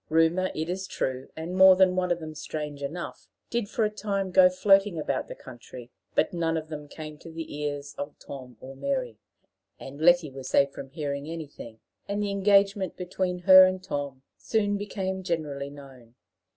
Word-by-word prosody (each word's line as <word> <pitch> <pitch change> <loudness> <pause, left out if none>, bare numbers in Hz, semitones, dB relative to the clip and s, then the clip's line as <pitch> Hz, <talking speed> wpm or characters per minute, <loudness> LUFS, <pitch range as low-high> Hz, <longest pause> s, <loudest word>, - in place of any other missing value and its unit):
Rumors, 165 +4 +3
it 155 +1 -2
is 190 +2 -3
true 130 -6 -3
and 165 +3 -5
more 190 0 +8
than 185 -1 +4
one 180 -1 0
of 175 - +1
them 155 -1 -7
strange 150 -1 -6
enough 160 +5 -6 0.2
did 235 -4 -1
for 225 - 0
a - - +1
time 200 -3 -2
go 180 0 +7
floating 195 0 +3
about 140 -4 -2
the - - -8
country; 125 -1 -12 0.2
but - - +2
none 165 -1 0
of 155 0 -5
them 150 -2 -7
came 155 0 -9
to 165 - -11
the 165 -2 -7
ears 145 -1 -4
of 145 +1 -5
Tom 130 -4 -10
or 130 - -9
of 135 - -14
Mary, 260 - -2 0.6
and 140 +3 -9
Letty 175 -3 +5
was 130 -1 -7
safe 140 0 +3
from 135 -1 -9
hearing 145 0 -4
anything; 145 -8 -8 0.3
and 200 +1 -2
the 200 - -1
engagement 200 -1 +2
between 180 0 -2
her 185 -1 +10
and 185 0 -1
Tom 140 -6 -4 0.2
soon 205 -2 0
became 190 -2 -3
generally 150 -6 -3
known. 135 -5 -14
165 Hz, 190 wpm, -27 LUFS, 140-190 Hz, 0.6 s, her